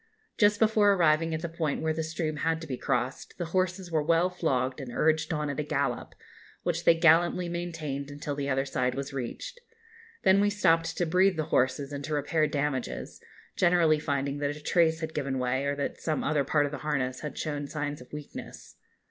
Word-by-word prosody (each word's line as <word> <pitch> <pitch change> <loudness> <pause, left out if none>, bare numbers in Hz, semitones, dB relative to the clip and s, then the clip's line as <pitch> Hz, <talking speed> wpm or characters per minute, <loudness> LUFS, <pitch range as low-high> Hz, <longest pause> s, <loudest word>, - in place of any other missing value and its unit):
Just 205 -1 +4
before 215 -2 +4
arriving 165 -3 +3
at 160 - -5
the - - -1
point 160 -3 -2
where 160 0 +1
the 160 - -2
stream 160 -1 -3
had 160 +1 0
to - - -6
be 135 -4 -3
crossed, 125 0 -2
the 175 - -2
horses 185 -1 0
were 160 -2 +2
well 165 +4 +2
flogged 130 -7 -1
and 130 -2 -7
urged 155 +5 +1
on 150 -2 -1
at 145 0 -3
a - - 0
gallop, 145 -1 -2 0.5
which 170 -1 -1
they 170 - +7
gallantly 170 +2 +4
maintained 165 -5 -4
until 145 +1 -5
the 140 0 -3
other 135 0 +1
side 125 -2 -1
was 140 +1 -5
reached. 310 - -5 0.6
Then 190 +1 +5
we 205 - +3
stopped 165 -5 +2
to 175 - +1
breathe 180 +2 +3
the 155 - +1
horses 130 +2 +1
and 140 0 -5
to 155 - -2
repair 155 +2 +1
damages, 145 -3 -3 0.3
generally 170 -3 +4
finding 140 -1 -2
that 145 0 -1
a 150 - -13
trace 165 -1 +2
had 160 0 -4
given 140 -3 -2
way, 130 +2 0
or 140 0 0
that 140 - -4
some 155 -2 -1
other 150 -2 +1
part 145 +2 +2
of 145 - -4
the 145 - -5
harness 135 -4 -1
had 150 -3 -6
shown 145 -2 -3
signs 145 -1 -4
of 125 - -15
weakness. 150 -1 -9
155 Hz, 205 wpm, -28 LUFS, 140-165 Hz, 0.6 s, they